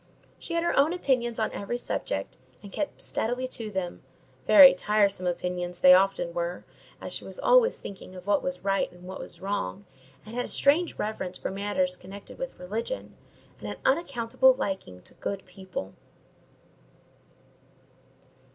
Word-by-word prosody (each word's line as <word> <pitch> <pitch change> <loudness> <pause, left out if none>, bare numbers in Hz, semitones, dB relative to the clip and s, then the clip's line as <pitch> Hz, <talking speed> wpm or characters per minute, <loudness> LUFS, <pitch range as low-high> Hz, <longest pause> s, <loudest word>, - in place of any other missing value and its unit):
She 335 - -5
had 335 - +1
her 345 - +1
own 290 +5 +4
opinions 250 -9 0
on 220 - 0
every 205 +4 -3
subject, 95 - -4 0.2
and 200 - -10
kept 295 - -4
steadily 245 +3 -1
to 225 -3 -5
them—very 205 - +4
tiresome 200 -1 +1
opinions 180 0 -3
they 180 0 +9
often 185 -2 +3
were; 175 +1 -3 0.3
as - - -6
she - - -4
was - - -8
always - - +4
thinking 190 -1 -10
of 180 -1 -10
what 205 -1 +2
was 180 0 -4
right 195 0 +1
and 180 0 -16
what 185 +1 -7
was - - -9
wrong, 100 - -3 0.4
and 215 - -10
had 245 +1 -1
a - - -9
strange 315 +5 +2
reverence 190 -4 -3
for - - -4
matters 195 -2 -1
connected 195 - -11
with - - -5
religion, 220 - -5 0.4
and - - -6
an - - -6
unaccountable 265 -3 +3
liking 190 - -4
to - - -15
good 195 -1 -5
people." 180 - -7
200 Hz, 155 wpm, -27 LUFS, 180-255 Hz, 0.4 s, they